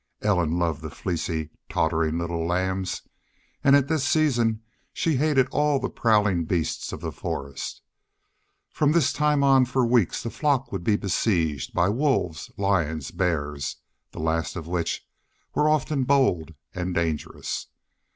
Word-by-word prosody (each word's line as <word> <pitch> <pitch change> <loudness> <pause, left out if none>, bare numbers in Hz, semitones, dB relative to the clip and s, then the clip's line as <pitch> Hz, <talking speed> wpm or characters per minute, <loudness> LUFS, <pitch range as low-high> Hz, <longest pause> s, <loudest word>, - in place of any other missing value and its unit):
Ellen 90 -6 +2
loved 85 -3 0
the 80 - -6
fleecy, 80 -2 -3 0.2
tottering 80 0 +1
little 85 -1 -2
lambs, 95 +2 -1 0.6
and 140 -1 +6
at 140 -1 +3
this 155 -2 0
season 120 -7 +2 0.3
she 160 -3 0
hated 140 -2 +3
all 150 -1 +2
the - - -3
prowling 105 -7 +2
beast 85 -1 -1
of - - -6
the - - -3
forest. 70 0 -5 0.9
From 150 0 +2
this 140 -6 +3
time 150 -1 +2
on 135 -1 +6
for 125 0 +1
weeks 115 -6 +2
the 115 - -4
flock 135 -4 0
would 95 -3 -4
be 105 +3 +3
besieged 85 - 0
by 85 +2 +3
wolves, 115 - 0
lions, 80 -8 0
bears, 75 -6 -1 0.4
the - - -9
last 80 +1 -1
of 85 -4 -5
which 85 -1 -2 0.5
were 150 +1 +3
often 150 -2 +1
bold 90 - +2 0.2
and 90 0 -3
dangerous. 80 -3 -2
95 Hz, 145 wpm, -25 LUFS, 80-135 Hz, 0.9 s, and